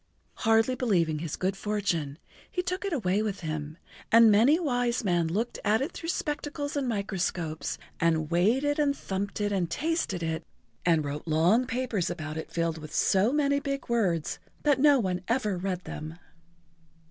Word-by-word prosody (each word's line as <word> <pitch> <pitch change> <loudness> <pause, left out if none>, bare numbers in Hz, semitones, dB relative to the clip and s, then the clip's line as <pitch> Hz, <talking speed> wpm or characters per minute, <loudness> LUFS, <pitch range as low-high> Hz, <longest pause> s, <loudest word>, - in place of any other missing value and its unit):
Hardly 225 +2 +3
believing 180 -11 +1
his 160 -2 -4
good 190 +1 -1
fortune, 190 -9 -2 0.3
he 360 - -2
took 365 +2 -3
it 395 - -2
away 205 - +1
with 210 -3 -3
him, 155 -1 -4 0.3
and 230 -1 +8
many 245 +11 +5
wise 245 -6 0
men 175 -4 +2
looked 215 +9 -2
at 215 +1 +3
it 275 +8 -2
through 330 - -6
spectacles 295 -3 -3
and 280 -2 0
microscopes, 185 -7 -2 0.2
and 160 -1 +1
weighed 210 +11 +3
it 290 +1 0
and 285 -2 +2
thumped 195 +2 -4
it 205 0 0
and 185 -4 0
tasted 285 - -1
it 160 0 -2 0.4
and 165 -3 +3
wrote 145 +3 -5
long 175 +11 +3
papers 235 -6 -1
about 155 -3 -5
it 160 - -5
filled 165 -1 -1
with 155 -1 -9
so 195 +5 +3
many 280 -1 +2
big 275 -2 -4
words 185 -10 0 0.2
that 290 -3 +3
no 285 -1 +6
one 185 -4 -1
ever 230 -4 +1
read 180 0 -3
them. 155 +2 -7
205 Hz, 170 wpm, -28 LUFS, 170-255 Hz, 0.4 s, and